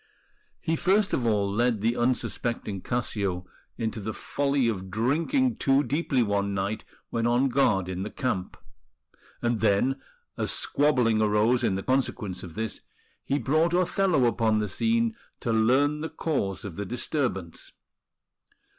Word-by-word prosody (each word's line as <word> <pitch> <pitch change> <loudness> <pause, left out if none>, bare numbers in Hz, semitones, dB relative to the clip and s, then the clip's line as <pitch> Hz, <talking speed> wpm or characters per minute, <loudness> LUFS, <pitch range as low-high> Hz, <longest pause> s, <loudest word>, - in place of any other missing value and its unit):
He 165 -1 0
first 195 +5 +2
of 120 - +1
all 105 -3 +2
led 120 -1 +1
the 115 +2 +1
unsuspecting 120 -4 -1
Cassio 100 -7 -2 0.3
into 110 -1 -2
the 110 +1 -4
folly 140 -3 0
of 95 -4 -3
drinking 160 - +1
too 135 +1 +3
deeply 140 -4 +1
one 100 -1 0
night 100 +3 -2 0.3
when 115 0 0
on 125 +3 +3
guard 110 -8 +2
in 95 0 -4
the 105 - -3
camp; 125 -10 -3 0.9
and 120 -2 +1
then, 110 +6 +2 0.4
as - - -1
squabbling 125 -7 +2
arose 110 +4 +3
in 95 -4 +1
consequence 125 -7 -1
of 85 -3 -9
this, 110 -1 -4 0.4
he 140 - 0
brought 155 +6 +2
Othello 180 -5 +2
upon 115 -2 +2
the 105 0 0
scene 230 - +1 0.2
to 115 - -1
learn 135 +7 +3
the 160 - -3
cause 100 - -2
of 95 -4 -7
the 100 - -3
disturbance. 120 - -2
120 Hz, 145 wpm, -27 LUFS, 105-140 Hz, 0.9 s, too